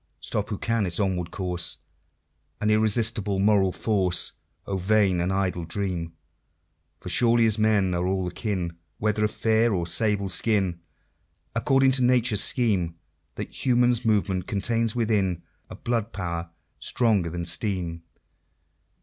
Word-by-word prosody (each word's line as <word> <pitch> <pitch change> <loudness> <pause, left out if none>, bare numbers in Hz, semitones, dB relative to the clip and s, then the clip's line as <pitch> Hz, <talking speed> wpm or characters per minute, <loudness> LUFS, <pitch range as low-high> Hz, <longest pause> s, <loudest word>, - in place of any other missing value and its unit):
Stop 105 - -3
who 105 - -3
can 115 -2 0
its 85 - -2
onward 90 -4 -1
course 90 -2 -2 0.8
And 105 0 +1
irresistible 110 -1 +2
moral 100 -1 +3
force; 95 -4 +1 0.3
O 100 - -3
vain 95 -1 +2
and 90 +2 -1
idle 95 -3 -1
dream! 85 -1 -4 0.9
For - - -8
surely 115 -1 +4
as 110 -1 +2
men 105 -4 +2
are 90 +1 -1
all 95 -1 -1
akin, 90 -3 -3 0.2
Whether 105 0 0
of 105 - +2
fair 110 +1 +1
or 90 -4 -1
sable 100 +2 +1
skin, 95 -2 0 0.8
According 135 +2 +3
to 130 -1 0
Nature's 120 -4 +4
scheme, 95 -9 +3 0.4
That - - -6
Human 125 -1 +3
Movement 100 -4 0
contains 115 +2 -1
within 100 -7 0 0.3
A - - -8
Blood 115 -2 -2
Power 85 -3 -4 0.3
stronger 105 -8 +1
than 85 +1 -4
Steam. 85 -2 -2
100 Hz, 135 wpm, -25 LUFS, 90-110 Hz, 0.9 s, surely